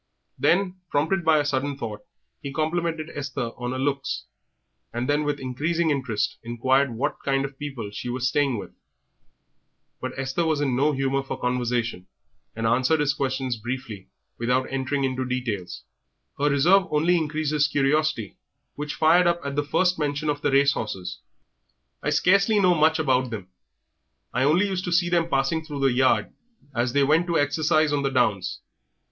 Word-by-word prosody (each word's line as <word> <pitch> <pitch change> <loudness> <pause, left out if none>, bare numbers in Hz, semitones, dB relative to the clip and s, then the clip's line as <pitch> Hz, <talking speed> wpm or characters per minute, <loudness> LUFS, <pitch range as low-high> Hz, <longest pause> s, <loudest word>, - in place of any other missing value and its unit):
Then, 190 +1 +2
prompted 160 +6 +1
by 160 -1 +4
a 145 - +1
sudden 140 0 -1
thought, 110 -6 -6 0.4
he 140 - -5
complimented 165 +1 -2
Esther 135 -4 -4
on 125 0 -4
her 130 - -3
looks, 140 +1 -2 0.7
and 120 +2 -3
then, 145 +1 +2
with 145 -1 -1
increasing 155 +6 0
interest, 125 -7 -1
inquired 130 +2 +1
what 120 - -2
kind 135 0 +1
of 135 -1 -9
people 135 -8 -5
she 105 +4 -6
was 125 0 -1
staying 135 -1 +1
with. - - -7 1.3
But 130 0 -5
Esther 135 +5 -1
was 160 -3 +1
in 135 -4 0
no 145 +4 +3
humour 135 0 0
for 135 - -6
conversation, 120 -6 -1 0.5
and 115 0 -3
answered 130 +7 +3
his 145 -1 +2
questions 130 -3 -2
briefly 115 -4 -6 0.3
without 125 +2 +1
entering 135 +1 -1
into 130 -1 -1
details. 120 -7 -4 0.6
Her 145 +1 +3
reserve 175 +7 +4
only 160 +4 +2
increased 155 -2 -1
his 150 -1 +3
curiosity, 145 - 0 0.4
which 150 0 -5
fired 170 +3 +4
up 170 0 +1
at 140 0 -3
the 145 - +1
first 180 +4 +1
mention 150 0 -1
of 145 0 -5
the 145 - +1
race 140 +1 +4
horses. 95 -4 -5 0.8
"I 145 - -1
scarcely 195 +8 +3
know 185 -2 +5
much 160 0 +3
about 130 -5 +1
them. 100 -5 -7 0.8
I 125 +2 +2
only 170 +8 +4
used 190 -2 -2
to 175 - -3
see 175 0 +3
them 170 -1 +1
passing 135 +4 +1
through 145 -3 -6
the 135 -2 +3
yard 130 +1 +2 0.4
as 120 0 0
they 140 - +4
went 155 +5 +3
to 170 - +1
exercise 155 +1 +2
on 145 - +1
the 135 - 0
downs. 100 -8 0
140 Hz, 175 wpm, -25 LUFS, 130-155 Hz, 1.3 s, know